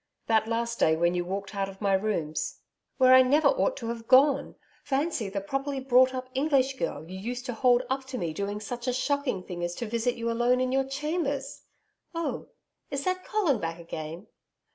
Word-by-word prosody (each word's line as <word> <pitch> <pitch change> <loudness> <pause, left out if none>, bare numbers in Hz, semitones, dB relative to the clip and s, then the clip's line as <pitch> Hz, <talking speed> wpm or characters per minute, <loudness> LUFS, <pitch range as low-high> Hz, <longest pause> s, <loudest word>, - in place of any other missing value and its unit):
That 220 -1 +2
last 235 0 -2
day 160 - +4
when 170 +2 +2
you 175 0 0
walked 195 +3 -5
out 195 -1 -2
of 195 0 -12
my 200 -2 +1
rooms....' 190 -6 -1 0.4
'Where 255 -1 +6
I 260 - +9
never 285 +5 +4
ought - - +1
to 230 -2 -5
have 230 -1 -5
gone. 275 +2 +4 0.3
Fancy 275 -6 -1
the 200 0 -3
properly 275 +6 -3
brought 260 0 +4
up 255 0 -4
English 270 -1 +2
girl 160 - -3
you 185 +2 -7
used 245 +5 -5
to 245 - -3
hold 245 +1 +3
up 265 0 -2
to 265 -1 -5
me 170 -6 -2
doing 200 +4 -3
such 240 +4 -6
a 250 - +1
shocking 275 -6 -1
thing 175 -1 -6
as 175 0 -2
to 240 - -4
visit 235 +2 -1
you 230 0 -2
alone 240 +2 +2
in 255 0 0
your 270 0 +2
chambers!... 280 0 -3 0.5
Oh! 335 0 -3 0.4
Is 280 -1 -3
that 370 0 -1
Colin 350 - +1
back 165 -1 -3
again?' 165 +2 -7
245 Hz, 205 wpm, -28 LUFS, 200-270 Hz, 0.5 s, I